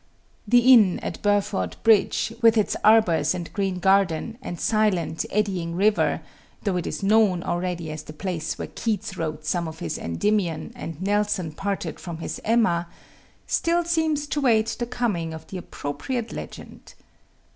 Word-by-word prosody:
The 245 +3 +6
inn 210 -7 +6
at - - -5
Burford 200 - 0
Bridge, 225 0 +3
with 230 -1 +5
its 215 - +1
arbours 185 -8 +4
and 175 -2 -6
green 195 -2 -1
garden 195 +3 +1
and 175 - -6
silent, 200 -7 +1
eddying 190 -5 -1
river 205 +3 +2 0.4
though 200 -4 0
it 175 - -3
is - - -4
known 200 -4 +3
already 175 -2 -2
as 155 0 -6
the 155 - -10
place 165 0 -4
where - - -5
Keats 215 -3 -3
wrote 155 -2 -4
some 170 +1 0
of 160 0 -8
his - - -4
Endymion 170 - -1
and 165 -2 -7
Nelson 205 -4 0
parted 190 -1 -4
from 170 -2 -6
his 165 - -5
Emma 210 -7 +2 0.6
still 340 +1 +1
seems 320 -3 +1
to 290 0 -2
wait 225 -3 +2
the 240 - -2
coming 205 -10 -2
of 160 0 -10
the 190 - -5
appropriate 220 - -4
legend. - - -9
195 Hz, 155 wpm, -24 LUFS, 170-220 Hz, 0.6 s, The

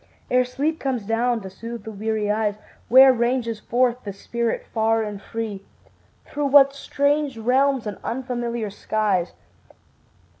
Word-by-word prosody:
Ere 250 0 +4
sleep 285 +6 -2
comes 255 -6 -2
down 230 +2 0
to 195 - -8
soothe 230 +3 -8
the 220 - -7
weary 215 0 -1
eyes, 210 -1 0 0.3
Where 260 +2 +8
ranges 235 -2 -1
forth 245 +2 0
the 205 - -5
spirit 235 +4 -3
far 225 0 +2
and 205 -2 -6
free? 215 -2 -5 0.6
Through 290 -1 -2
what 275 0 +6
strange 285 -1 0
realms 260 +2 +2
and 210 -2 -5
unfamiliar 240 -3 -3
skies. 205 -3 -1
235 Hz, 140 wpm, -23 LUFS, 215-260 Hz, 0.6 s, Where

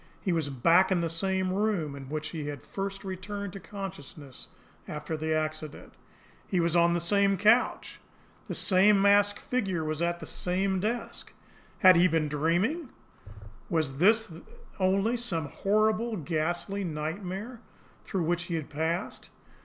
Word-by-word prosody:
He 190 - -2
was 160 -4 0
back 165 +9 +4
in 180 -2 +2
the 165 - -1
same 185 +2 0
room 195 -8 0
in 135 -1 -9
which 155 +1 -3
he 155 -3 -5
had 145 -4 -6
first 195 0 -5
returned 195 +1 -5
to 195 - -7
consciousness 150 - -8 0.4
after 150 +1 -4
the 155 +1 -3
accident. 155 -1 -3 0.5
He 185 - 0
was 170 0 +1
on 170 0 +4
the - - +1
same 195 +3 +2
couch. 215 +6 +2 0.5
The - - -4
same 195 +2 +4
masked 205 +1 +4
figure 195 -10 -1
was 155 +1 -2
at 170 0 0
the - - -8
same 190 +1 -1
desk. 225 +5 -4 0.5
Had 185 -2 +8
he 175 +2 +6
been 160 -3 0
dreaming? 175 - 0 0.8
Was 155 -5 -1
this 220 +5 +4
then 165 -4 -12 0.4
only 195 +5 +2
some 170 -11 -1
horrible, 215 +4 +1
ghastly 175 +5 -2
nightmare 185 +8 -5 0.4
through 190 -4 -2
which 175 +1 0
he 170 -2 -3
had 155 -3 -5
passed? 160 +4 -3
180 Hz, 155 wpm, -28 LUFS, 160-200 Hz, 0.8 s, Had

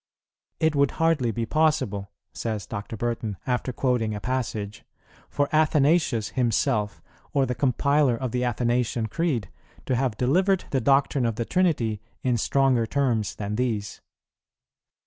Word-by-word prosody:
"It 160 -1 +2
would 140 -1 +3
hardly 160 -7 +2
be 115 +1 -2
possible," 130 -9 +1 0.2
says 110 -4 -3
Dr. 105 +1 -6
Burton, 115 -3 -2
after 125 0 -1
quoting 120 -4 0
a - - -4
passage, 110 -3 -3 0.5
"for 145 -1 0
Athanasius 150 -6 +3
himself, 110 -5 0 0.3
or 135 -1 +3
the 125 - -2
compiler 140 +1 +2
of 130 -1 -3
the 125 0 -1
Athanasian 120 -1 0
Creed, 125 - -2 0.3
to 130 - 0
have 125 -3 -1
delivered 180 - +2
the 135 - +1
doctrine 135 0 +2
of 115 - -2
the 115 - -2
Trinity 125 - +1 0.2
in 125 -2 +2
stronger 130 -1 +2
terms 120 -5 0
than 105 0 -4
these." 110 -5 -2
125 Hz, 140 wpm, -25 LUFS, 110-140 Hz, 0.5 s, would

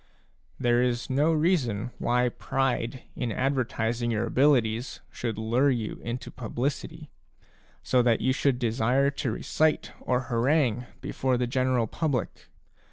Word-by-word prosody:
There 120 0 +3
is 125 +1 -1
no 145 +5 +3
reason 140 - +1
why 125 +1 +2
pride 130 -1 -2
in 125 -3 -2
ad 135 +6 +1
vertising 120 -2 -1
your 110 +1 0
abilities 120 -2 +2
should 115 -3 -4
lure 120 +6 +2
you 115 -5 -2
into 120 +2 -5
publicity, 125 +4 -4 0.7
so 125 - +3
that 120 -2 +3
you 130 +2 +2
should 135 -1 +1
desire 125 +3 +2
to 135 -3 -2
recite 155 +7 0
or 125 0 0
harangue 125 0 +1
before 130 -1 0
the 125 - 0
general 130 -1 +1
public. 140 +3 -3
125 Hz, 135 wpm, -27 LUFS, 120-135 Hz, 0.7 s, There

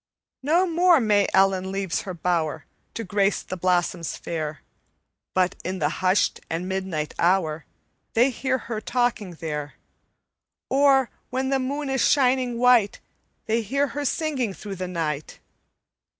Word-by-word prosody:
"No 330 +7 +3
more 345 -1 +4
May 210 -4 +3
Ellen 190 -1 +3
leaves 195 -3 -2
her 190 - -6
bower 160 -3 -1 0.3
To 230 - -3
grace 200 0 +1
the 185 - -5
blossoms 175 -2 0
fair; 155 -4 -4 0.7
But 185 -1 +2
in 185 +1 -3
the - - +1
hushed 185 +2 +2
and 170 +3 -3
midnight 190 -5 -3
hour 170 -3 +1 0.5
They 245 +4 +4
hear 260 +1 -1
her 225 -3 -5
talking 235 -6 -1
there, 150 -2 -5 0.9
Or, 270 -2 +4 0.2
when 260 +1 -1
the 270 -1 +2
moon 280 +3 -3
is 270 -1 0
shining 255 -3 +3
white, 245 -4 +4 0.5
They 225 +1 +1
hear 275 +6 0
her 290 +1 -4
singing 270 - -1
through 200 -2 -7
the 185 0 -3
night. 155 -4 -3
200 Hz, 140 wpm, -24 LUFS, 180-260 Hz, 0.9 s, more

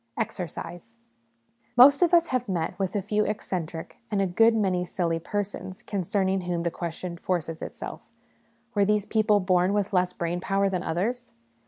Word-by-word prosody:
Exercise. 175 +5 -5 0.8
Most 275 +5 +8
of 350 - +4
us 340 -1 +6
have 250 -3 -1
met 170 -4 -1
with 190 0 -1
a 200 - 0
few 210 +1 +1
eccentric 180 -6 -4
and 205 -2 0
a 195 - +3
good 225 +6 +4
many 190 -4 +1
silly 170 -2 -1
persons, 190 0 -4
concerning 190 0 0
whom 175 -1 -2
the 170 - 0
question 170 +1 -5
forces 165 -3 -2
itself, - - -7 0.7
Were 205 - +3
these 210 0 +2
people 215 -1 +3
born 185 0 +2
with 205 -1 0
less 180 -1 +2
brain 175 0 -2
power 195 +2 +1
than 185 -2 -1
others? 210 - -2
190 Hz, 165 wpm, -26 LUFS, 175-210 Hz, 0.8 s, Most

